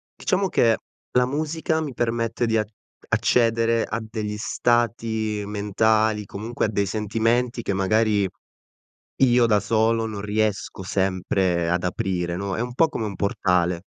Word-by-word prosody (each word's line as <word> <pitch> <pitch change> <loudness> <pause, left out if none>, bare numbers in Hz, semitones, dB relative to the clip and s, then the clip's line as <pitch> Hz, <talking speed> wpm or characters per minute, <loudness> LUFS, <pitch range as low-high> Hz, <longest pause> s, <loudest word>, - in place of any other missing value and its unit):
diciamo 195 +1 0
che 115 -8 +3 0.4
la 125 0 +5
musica 155 +3 -1
mi 145 -4 -4
permette 115 0 -1
di 115 -1 +1
a 110 - +1 0.4
accedere 115 -1 +2
a 110 - -3
degli 110 -1 -4
stati 110 -2 0
mentali, 105 +1 +1
comunque 110 +5 -3
a - - +1
dei 100 -2 0
sentimenti 115 +4 0
che 100 - -2
magari 105 +1 +2 1.0
io 120 -2 +5
da 105 -3 +3
solo 115 +2 +1
non 105 -2 -5
riesco 105 -2 -1
sempre 95 -2 0
ad 90 +1 0
aprire, 90 -1 -2
no, 100 0 -3
è - - -3
un 125 0 -3
po' 165 +5 +4
come 115 -7 -3
un 100 - -5
portale. 90 -3 +1
110 Hz, 145 wpm, -23 LUFS, 100-115 Hz, 1.0 s, la